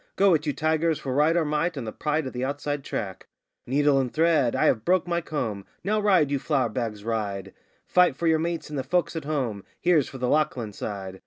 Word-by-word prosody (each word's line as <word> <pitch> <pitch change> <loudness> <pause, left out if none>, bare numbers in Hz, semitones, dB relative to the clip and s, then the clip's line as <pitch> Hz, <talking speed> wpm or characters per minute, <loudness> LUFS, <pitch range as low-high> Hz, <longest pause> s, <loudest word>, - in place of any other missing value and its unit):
'Go 195 -2 +5
it, 155 -1 0
you - - +2
tigers, 160 +1 +1
for 130 - -4
Right 150 +5 +3
or 165 - +2
Might 150 +2 -1
and 130 - -4
the 110 - -4
pride 150 +3 -1
of 130 - -5
the 125 0 -3
Outside 145 +1 -2
Track!' 95 -8 -5 0.4
'Needle 140 +2 +3
and 130 -2 -1
thread!' 160 -6 +2
'I - - +2
have 110 - +2
broke 180 +3 +2
my 170 0 0
comb!' 115 -11 -3 0.2
'Now 215 +2 +1
ride, 185 -9 +3
you 140 - +1
flour 140 -1 0
bags, 110 -4 -4
ride!' 100 -4 -3 0.3
'Fight 180 -6 +4
for 170 - -4
your 160 -1 +4
mates 170 -1 -3
and 145 - -2
the - - -2
folk 175 +2 0
at 160 -3 -4
home!' 125 -10 -2 0.2
'Here's 165 -6 +3
for 135 - -8
the 125 -1 -1
Lachlan 130 -8 0
side! 95 -2 -6
145 Hz, 230 wpm, -26 LUFS, 120-160 Hz, 0.4 s, Go